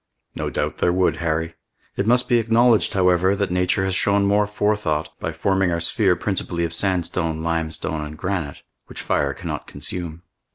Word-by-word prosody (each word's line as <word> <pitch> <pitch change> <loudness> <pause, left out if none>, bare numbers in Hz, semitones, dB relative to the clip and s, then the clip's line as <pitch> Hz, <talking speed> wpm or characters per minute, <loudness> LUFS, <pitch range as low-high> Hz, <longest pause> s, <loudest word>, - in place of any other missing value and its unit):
"No - - -3
doubt - - -2
there 90 - +2
would, 90 -2 +2
Harry; 80 0 -1 0.4
it 100 - -1
must 125 +1 +3
be 120 -1 +4
acknowledged, 115 0 +3
however, 90 0 +3
that 100 -2 -1
nature 90 +1 +1
has 95 - -1
shown 100 +1 +2
more 105 +1 +3
forethought 105 -7 0
by - - -3
forming 95 -1 +1
our 85 -1 0
sphere 95 +2 +2
principally 90 -3 -2
of 85 - -4
sandstone, 85 -3 -1
limestone, 80 -2 -2
and 75 +1 -8
granite, 90 -5 -3 0.2
which - - -8
fire 70 -1 0
cannot - - -5
consume." 85 -2 -6
90 Hz, 170 wpm, -22 LUFS, 80-100 Hz, 0.4 s, be